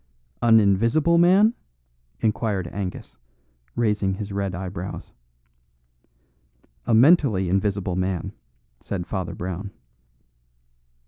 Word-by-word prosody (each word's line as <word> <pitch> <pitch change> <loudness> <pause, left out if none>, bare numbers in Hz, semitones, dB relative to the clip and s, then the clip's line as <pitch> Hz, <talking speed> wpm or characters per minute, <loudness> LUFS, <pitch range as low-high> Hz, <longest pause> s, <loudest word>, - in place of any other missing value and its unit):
"An 115 -1 +6
invisible 115 - +3
man?" 195 +6 +5 0.7
inquired 105 -4 -1
Angus, 95 -2 -6 0.6
raising 105 -4 0
his 105 0 -6
red 100 -2 -2
eyebrows. 90 0 -7 1.7
"A 120 - +2
mentally 125 - +4
invisible 95 -1 -1
man," 90 -2 -2 0.5
said 90 -3 -5
Father 95 -3 -4
Brown. 95 +3 -5
100 Hz, 85 wpm, -23 LUFS, 95-115 Hz, 1.7 s, An